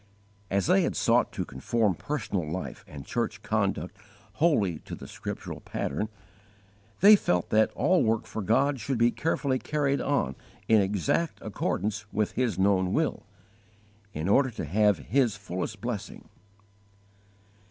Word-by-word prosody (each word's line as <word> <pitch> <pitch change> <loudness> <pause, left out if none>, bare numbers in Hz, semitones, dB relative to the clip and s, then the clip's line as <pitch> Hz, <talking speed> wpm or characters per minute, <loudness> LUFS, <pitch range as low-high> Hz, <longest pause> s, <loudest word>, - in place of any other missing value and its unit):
As 100 -1 +1
they - - +4
had - - -1
sought - - +2
to - - -3
conform 105 - 0
personal 100 - -3
life 95 +3 -5
and 70 -2 -9
church - - -3
conduct - - -1 0.5
wholly 105 - +3
to - - -8
the - - -10
scriptural - - -6
pattern, 95 +10 -3 0.9
they 210 +2 +10
felt 90 - 0
that 110 0 +4
all 185 -1 +3
work 110 -1 +1
for 110 - -5
God 135 +7 +2
should 120 +4 -2
be 120 +1 +4
carefully 140 -3 0
carried 145 -2 0
on 140 0 0 0.3
in 110 -2 +5
exact 100 - 0
accordance 105 0 -2
with 105 0 0
His 125 -2 -1
known 95 -1 +2
will, 160 0 -1 0.8
in 80 0 -4
order 130 +6 +4
to 110 - -5
have 105 +5 +3
His 120 -2 +1
fullest 100 +1 -5
blessing. 115 -4 -5
110 Hz, 140 wpm, -28 LUFS, 95-135 Hz, 0.9 s, they